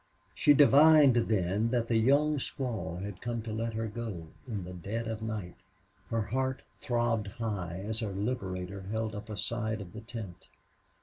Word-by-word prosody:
She 145 - +5
divined 145 -1 +7
then 105 -2 +1
that 120 -1 0
the 115 - +1
young 145 +6 +4
squaw 110 - -3
had 100 -2 -7
come 120 -2 -3
to 110 -1 -5
let 115 +1 -2
her 115 0 -1
go, 105 -7 -6 0.2
in 105 -6 -3
the 90 +1 -8
dead 105 +6 -4
of 110 -1 -4
night. 105 -6 -4 0.5
Her 115 -1 0
heart 130 +5 -1 0.2
throbbed 120 -3 0
high 95 -5 -4
as 110 0 +1
her 110 -4 -2
liberator 95 -3 -3
held 110 0 -2
up 105 +1 -7
a 105 - -5
side 110 0 -1
of 95 -2 -9
the 110 - -7
tent. 110 -6 -8
110 Hz, 175 wpm, -31 LUFS, 100-120 Hz, 0.5 s, divined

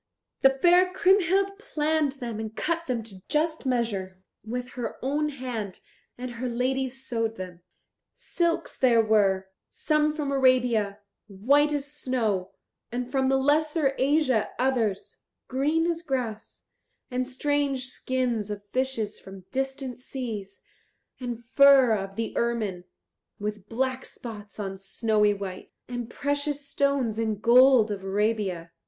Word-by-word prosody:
The 270 - +8
fair 350 +7 +4
Kriemhild 390 +1 +3
planned 310 -6 0
them 240 -5 -5
and 220 0 -5
cut 335 0 -1
them 240 -3 -1
to 195 -4 -12
just 310 -1 0
measure 205 -7 -1 0.2
with 245 +3 -4
her 245 -3 -4
own 300 +3 +1
hand 245 -8 -5 0.4
and 250 0 -5
her 245 +1 -4
ladies 260 +2 -1
sewed 225 -2 -1
them. 180 -3 -8 0.5
Silks 340 -1 -1
there 235 -3 +4
were, 195 -3 +2 0.2
some 305 0 +1
from 295 -3 -2
Arabia, 250 -6 +3 0.3
white 275 +10 +3
as 290 -2 -1
snow, 220 -10 -1 0.4
and 245 +1 -3
from 265 -1 +2
the 270 - +3
Lesser 295 +1 +2
Asia 270 -4 +2
others, 240 -7 0 0.3
green 295 +5 +1
as 335 -1 -1
grass, 250 -8 -4 0.5
and 250 0 -1
strange 275 0 0
skins 250 -4 -2
of 205 -1 -5
fishes 255 -5 -1
from 190 -1 -12
distant 270 -1 -3
seas, 225 -7 -6 0.6
and 240 -2 -5
fur 265 -1 +6
of 195 -1 -5
the 225 +1 -3
ermine, 215 -7 -1 0.5
with 210 -1 -5
black 260 +2 -1
spots 215 -3 -9
on 195 -2 -4
snowy 210 +1 +2
white, 190 -2 -7 0.2
and 245 -2 -5
precious 285 +1 -2
stones 280 -6 0
and 220 -3 -1
gold 245 -2 +6
of 195 -2 -4
Arabia. 195 -4 -1
250 Hz, 135 wpm, -26 LUFS, 215-280 Hz, 0.6 s, The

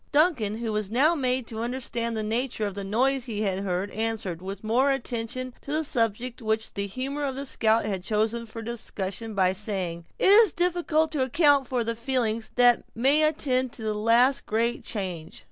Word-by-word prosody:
Duncan, 285 - +2
who 225 -2 -3
was 210 -2 -2
now 275 +9 +4
made 255 -5 0
to 225 -1 -6
understand 235 -2 -2
the 215 - -1
nature 225 +1 -1
of 200 - -3
the 200 0 -5
noise 250 +6 +1
he 215 -4 -3
had 190 -2 -1
heard, 190 0 -2
answered, 215 -6 -2
with 195 +2 -7
more 245 +6 +2
attention 255 -1 -3
to 280 - -8
the 310 +1 +1
subject 240 -2 -2
which 220 0 -1
the 200 -1 -3
humor 270 +7 -4
of 270 -2 -2
the 275 +1 -4
scout 225 -4 +1
had 195 -3 -2
chosen 220 +3 -1
for 225 +1 -8
discussion, 220 -2 -4
by 185 -1 +3
saying: 185 -4 -3
"It 385 - +5
is 425 -3 +7
difficult 340 -3 +1
to 300 -4 -1
account 285 0 +4
for 245 -2 -1
the 230 +1 -2
feelings 230 -2 -1
that 245 -1 +5
may 270 +6 +4
attend 260 -5 +1
the 220 -1 -3
last 235 +6 +3
great 230 +3 0
change." 185 -7 -4
230 Hz, 190 wpm, -26 LUFS, 215-265 Hz, -, is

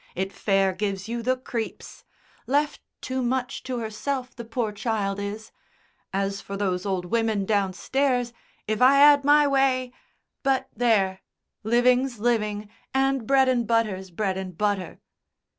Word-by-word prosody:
It 190 +2 -3
fair 195 -2 +1
gives 195 0 -3
you 235 +1 -3
the 255 +2 +1
creeps... 235 -3 -6 0.4
left 290 +2 0 0.2
too 260 -1 -3
much 250 0 -2
to 255 -1 -4
herself, 250 +4 -4
the 235 - -7
poor 230 -1 -2
child 205 -2 -2
is. 205 +2 -6 0.6
As 195 +1 -2
for 200 - -6
those 190 -1 -1
old 185 -2 -1
women 220 -1 0
downstairs, 240 +6 0 0.3
if 215 +1 -1
I 270 +2 +6
'ad 285 0 +7
my 295 +1 +5
way 265 -2 +1 0.5
but 265 -1 0
there! 200 -6 +2 0.4
Living's 245 +3 +2
living, 210 -2 0 0.3
and 270 -3 +1
bread 270 -1 +4
and 245 -3 +1
butter's 210 -5 0
bread 190 +1 -2
and 185 -3 -7
butter!" 205 -4 -1
230 Hz, 140 wpm, -25 LUFS, 200-255 Hz, 0.6 s, ad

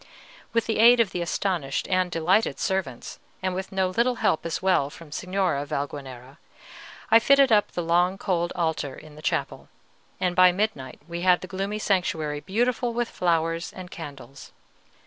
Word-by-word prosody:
With 230 -1 +1
the 220 - -1
aid 240 +2 +7
of 220 -5 +3
the 180 - -3
astonished 170 -5 -2
and 185 -1 +1
delighted 170 -1 +1
servants, 170 - -3 0.2
and 185 +1 -3
no 190 -1 0
little 235 +6 +1
help 165 -7 0
as 165 - -2
well 185 -7 +2
from 155 0 -13
Signora 185 -3 -1
Valguanera, 140 -2 -6 0.7
I 225 - +8
fitted 275 +1 +5
up 210 -2 +3
the 175 - -2
long 175 +3 +2
cold 175 -3 -1
Altar 160 -5 -2
in 155 -1 -13
the 150 - -12
chapel, - - -2 0.5
and 180 -1 0
by 185 0 +7
midnight 180 -10 -3
we 170 0 -5
had 180 -1 +4
the 185 - -7
gloomy 195 +3 -3
sanctuary 165 -8 -1
beautiful 235 - -1
with 240 -1 -1
flowers 165 -1 0
and 185 -1 -10
candles. 140 -5 -10
180 Hz, 165 wpm, -25 LUFS, 155-195 Hz, 0.7 s, I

